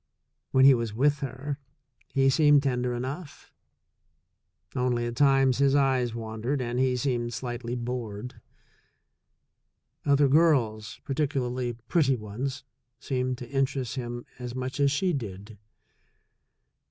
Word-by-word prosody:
When 130 0 +5
he 135 - +9
was 115 -3 -2
with 145 +4 +2
her, 135 +2 -5 0.5
he 135 0 +2
seemed 145 -1 +5
tender 125 -2 0
enough; 140 +6 -6 1.2
only, 125 -2 0
at 120 0 -4
times, 135 -2 +4
his 140 0 +4
eyes 130 -4 +2
wandered 115 +4 -3
and 120 0 -2
he 130 -1 +2
seemed 120 -3 -1
slightly 120 0 -4
bored. 120 -2 -5 1.6
Other 140 0 +4
girls, 130 -8 +2
particularly 130 -3 -1
pretty 145 -7 +3
ones, 120 +5 -5 0.4
seemed 130 -1 -2
to 120 -1 -9
interest 135 -3 -1
him 120 -2 -5
as 125 0 -6
much 130 +2 -4
as 140 -1 +4
she 175 +6 +1
did. 105 -5 -6
130 Hz, 120 wpm, -27 LUFS, 120-140 Hz, 1.6 s, he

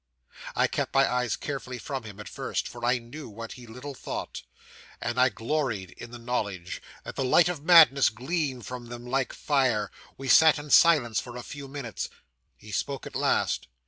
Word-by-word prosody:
'I - - +4
kept - - -2
my 135 0 +5
eyes 125 -2 0
carefully 135 -3 -5
from 130 0 -5
him 105 -2 -10
at 105 - -8
first, - - -3
for 120 -1 -10
I 125 +1 +3
knew 125 +4 -9
what 115 +2 -8
he 125 -2 -10
little 125 +5 -8
thought - - -5 0.6
and 120 +2 -2
I 130 +1 +6
gloried 115 - -2
in 120 +10 -10
the 120 - -9
knowledge 100 -7 -3 0.2
that - - -8
the - - -1
light 160 +7 +5
of 170 -5 -3
madness 160 -5 +7
gleamed 130 - -3
from 125 0 -7
them 120 0 -8
like 130 +1 0
fire. 130 -8 +1 0.3
We 135 - -6
sat 160 +4 +7
in 145 0 -7
silence 145 -10 +5
for 120 -1 -9
a 120 - -6
few 140 +2 -8
minutes. 135 -5 -5 0.5
He 105 - -12
spoke 135 +6 -2
at - - -8
last. 65 - +1
125 Hz, 190 wpm, -27 LUFS, 115-140 Hz, 0.6 s, madness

